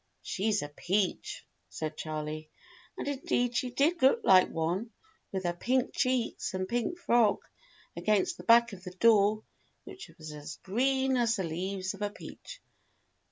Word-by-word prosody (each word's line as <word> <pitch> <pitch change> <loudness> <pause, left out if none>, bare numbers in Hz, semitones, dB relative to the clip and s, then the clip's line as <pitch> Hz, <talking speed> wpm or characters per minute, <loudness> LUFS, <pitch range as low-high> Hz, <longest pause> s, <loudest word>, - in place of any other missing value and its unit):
"She's 205 -1 0
a - - -4
peach," 185 +6 -2 0.2
said 155 -1 -5
Charley. 155 0 -5 0.5
And - - -4
indeed 245 -3 0
she 250 - 0
did 300 +7 +1
look 270 - +5
like 185 - +6
one, 175 +8 -2 0.4
with 190 -1 -3
her 175 -1 0
pink 250 +8 0
cheeks 255 -7 -1
and 185 0 -2
pink 240 - -1
frock, 235 - +3 0.5
against 215 - +1
the - - -10
background 235 -4 +5
of 180 - -6
the - - -29
door, 215 0 +4 0.4
which 370 - -10
was 155 -1 -8
as 150 0 -8
green 265 +5 +1
as 235 -1 +2
the 190 - -2
leaves 185 +3 -3
of - - -12
a 205 - 0
peach. - - -11
210 Hz, 160 wpm, -30 LUFS, 180-245 Hz, 0.5 s, like